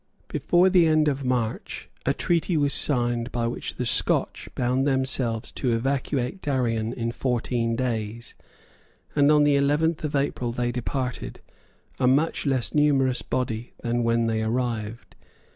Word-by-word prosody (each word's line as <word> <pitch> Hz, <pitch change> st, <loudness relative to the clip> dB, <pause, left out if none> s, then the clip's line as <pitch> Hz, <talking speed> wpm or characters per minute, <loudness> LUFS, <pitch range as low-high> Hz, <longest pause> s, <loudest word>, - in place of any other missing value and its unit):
Before 175 Hz, +1 st, +3 dB
the 175 Hz, -3 st, +5 dB
end 155 Hz, -1 st, +3 dB
of 140 Hz, -1 st, 0 dB
March 125 Hz, -3 st, -2 dB, 0.2 s
a -, -, +4 dB
treaty 170 Hz, 0 st, +1 dB
was 145 Hz, -2 st, +2 dB
signed 120 Hz, -3 st, 0 dB
by 120 Hz, -1 st, -1 dB
which 120 Hz, -, -4 dB
the -, -, -3 dB
Scotch -, -, 0 dB
bound 130 Hz, +2 st, +1 dB
themselves 130 Hz, -4 st, 0 dB
to 125 Hz, -3 st, -1 dB
evacuate 135 Hz, +6 st, -1 dB
Darien 115 Hz, -5 st, 0 dB
in 115 Hz, -1 st, -3 dB
fourteen 120 Hz, -2 st, -1 dB
days; 115 Hz, -2 st, -3 dB, 0.8 s
and 145 Hz, 0 st, +5 dB
on 150 Hz, -1 st, +5 dB
the 145 Hz, -1 st, +4 dB
eleventh 150 Hz, +4 st, +1 dB
of 150 Hz, -1 st, -2 dB
April 140 Hz, -3 st, -1 dB
they 120 Hz, 0 st, -1 dB
departed, 125 Hz, +1 st, -4 dB, 0.6 s
a 130 Hz, -, +3 dB
much 145 Hz, +4 st, +2 dB
less 130 Hz, -3 st, 0 dB
numerous 135 Hz, -4 st, +3 dB
body 120 Hz, -2 st, -3 dB
than 120 Hz, 0 st, 0 dB
when 115 Hz, 0 st, +2 dB
they 110 Hz, -1 st, 0 dB
arrived. 115 Hz, -1 st, -3 dB
125 Hz, 145 wpm, -25 LUFS, 115-140 Hz, 0.8 s, the